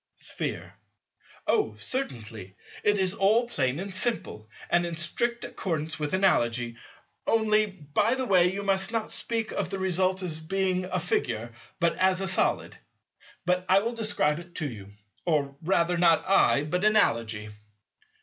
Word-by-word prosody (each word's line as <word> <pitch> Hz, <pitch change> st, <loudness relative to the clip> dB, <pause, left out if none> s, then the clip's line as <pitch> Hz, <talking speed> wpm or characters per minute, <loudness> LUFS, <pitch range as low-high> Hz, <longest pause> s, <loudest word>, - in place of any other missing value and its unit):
Sphere. -, -, -3 dB, 0.7 s
Oh, 425 Hz, -, +1 dB
certainly. 110 Hz, -, -5 dB, 0.3 s
It 205 Hz, 0 st, +3 dB
is 190 Hz, -1 st, +1 dB
all 220 Hz, +5 st, +3 dB
plain 130 Hz, -, -1 dB
and 195 Hz, +1 st, -5 dB
simple, 185 Hz, -, -1 dB, 0.2 s
and 175 Hz, -, +3 dB
in 170 Hz, -1 st, -3 dB
strict 235 Hz, +8 st, -1 dB
accordance 160 Hz, -4 st, -3 dB
with 150 Hz, +4 st, -1 dB
Analogy—only, 190 Hz, -, 0 dB
by 195 Hz, -, 0 dB
the 260 Hz, 0 st, -2 dB
way, 180 Hz, -5 st, +4 dB
you 200 Hz, +1 st, -4 dB
must 195 Hz, +1 st, +1 dB
not 225 Hz, -2 st, -2 dB
speak 225 Hz, -1 st, -2 dB
of -, -, -2 dB
the 195 Hz, -, -3 dB
result 190 Hz, 0 st, +1 dB
as 160 Hz, -3 st, -1 dB
being 185 Hz, +2 st, -1 dB
a 185 Hz, 0 st, -2 dB
Figure, 120 Hz, -9 st, -2 dB, 0.3 s
but 170 Hz, -1 st, +2 dB
as 185 Hz, 0 st, +3 dB
a 195 Hz, -, -1 dB
Solid. 190 Hz, +3 st, +1 dB, 0.7 s
But 180 Hz, 0 st, +1 dB
I 190 Hz, -, +6 dB
will 230 Hz, +3 st, -2 dB
describe 205 Hz, -9 st, 0 dB
it 175 Hz, 0 st, -13 dB
to 155 Hz, -, -2 dB
you. 105 Hz, -7 st, -8 dB, 0.4 s
Or 145 Hz, -4 st, 0 dB
rather 170 Hz, 0 st, +1 dB
not 170 Hz, +1 st, +4 dB
I, 190 Hz, -6 st, +4 dB
but 180 Hz, +5 st, -2 dB
Analogy. 115 Hz, -, +2 dB
180 Hz, 150 wpm, -27 LUFS, 150-200 Hz, 0.7 s, I